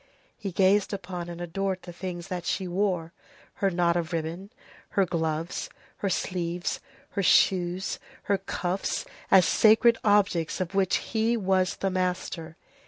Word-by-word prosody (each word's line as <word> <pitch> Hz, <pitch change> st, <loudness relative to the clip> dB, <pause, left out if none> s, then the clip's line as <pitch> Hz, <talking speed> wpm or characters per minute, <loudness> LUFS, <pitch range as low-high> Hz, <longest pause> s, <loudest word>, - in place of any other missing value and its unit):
He 200 Hz, -3 st, -5 dB
gazed 195 Hz, +3 st, +3 dB
upon 180 Hz, -3 st, -5 dB
and 170 Hz, 0 st, -7 dB
adored 185 Hz, +2 st, -2 dB
the 175 Hz, -, -9 dB
things 175 Hz, -1 st, -6 dB
that 180 Hz, -2 st, -3 dB
she 190 Hz, -1 st, -1 dB
wore, 180 Hz, -2 st, -1 dB, 0.5 s
her 195 Hz, -, +4 dB
knot 170 Hz, -1 st, +2 dB
of 170 Hz, -1 st, -1 dB
ribbon, 165 Hz, +4 st, -3 dB, 0.5 s
her 195 Hz, -, +5 dB
gloves, 165 Hz, -1 st, -2 dB, 0.3 s
her 200 Hz, -, -1 dB
sleeves, 175 Hz, -1 st, -2 dB, 0.3 s
her 200 Hz, -, -1 dB
shoes, 180 Hz, -1 st, +3 dB, 0.2 s
her 200 Hz, -1 st, +1 dB
cuffs, 190 Hz, -1 st, -2 dB, 0.2 s
as 185 Hz, -2 st, +7 dB
sacred 230 Hz, +2 st, +5 dB
objects 200 Hz, -6 st, +2 dB
of 185 Hz, 0 st, -3 dB
which 195 Hz, -1 st, +2 dB
he 225 Hz, +1 st, 0 dB
was 190 Hz, -3 st, +1 dB
the 195 Hz, -, -1 dB
master. 180 Hz, -3 st, -2 dB
185 Hz, 145 wpm, -27 LUFS, 175-195 Hz, 0.5 s, as